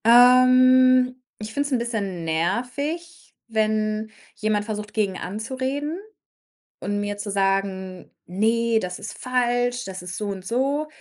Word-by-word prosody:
Ähm, 255 +1 +6 0.2
ich 215 0 -7
finde 285 +3 0
es - - -9
'n - - +4
bisschen 205 -7 -3
nervig, 250 - -3
wenn 215 -1 0 0.2
jemand 210 -1 0
versucht, 210 -1 -5
gegen 200 -4 0
anzureden 260 - -3 0.8
und 205 0 -2
mir 205 0 -3
zu 205 0 -5
sagen: 195 -1 -1
„Ne, 225 +4 +1
das 180 -3 -5
ist - - -8
falsch, 245 0 0
das 190 -1 -7
ist 180 -1 -6
so 210 - -3
und 195 -2 -5
so.“ 275 +7 0
220 Hz, 135 wpm, -23 LUFS, 200-255 Hz, 0.8 s, Ähm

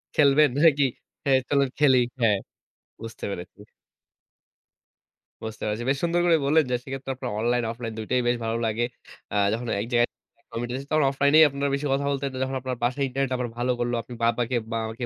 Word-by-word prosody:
খেলবেন 145 0 +5
নাকি? 145 -3 +5 0.4
হ্যাঁ, 135 -1 +4
চলেন 140 -2 +2
খেলি। 130 -4 +5 0.2
হ্যাঁ, 105 -4 +3 0.6
বুঝতে 115 0 -8
পেরেছি। 95 +2 -8 1.8
বুঝতে 110 -1 -6
পেরেছি। 105 +3 -2
বেশ 135 - +2
সুন্দর 170 +1 +2
করে 165 -2 +5
বললেন, 155 +2 +4
যে - - +3
সেক্ষেত্রে 135 0 -5
আপনার 125 -2 -5
অনলাইন 120 +1 +1
অফলাইন 115 -1 -6
দুইটাই 125 +3 0
বেশ 120 0 +2
ভালো 115 +1 -1
লাগে। 110 +2 0 0.5
আ - - -2 0.2
যখন 120 +1 -3
এক - - -3
জায়গায় 120 0 +4 0.4
কমিউটি 120 +1 -4
দিছ 135 +1 -5
তখন 155 -2 +3
অফলাইনেই 140 +3 +5
আপনারা 140 +1 -2
বেশি 145 +1 -4
কথা 140 +1 0
বলতেন। 140 0 -2
যখন 130 0 -3
আপনার 130 -1 -3
বাসায় 130 +3 0
ইন্টারনেট 135 0 -2
আবার 125 -1 -2
ভালো 125 +1 0
করলো, 120 0 -1
আপনি 120 +2 -11
বাবাকে, 120 +1 +1 0.2
বাবা-মাকে 115 +2 -3
125 Hz, 180 wpm, -25 LUFS, 120-140 Hz, 1.8 s, খেলবেন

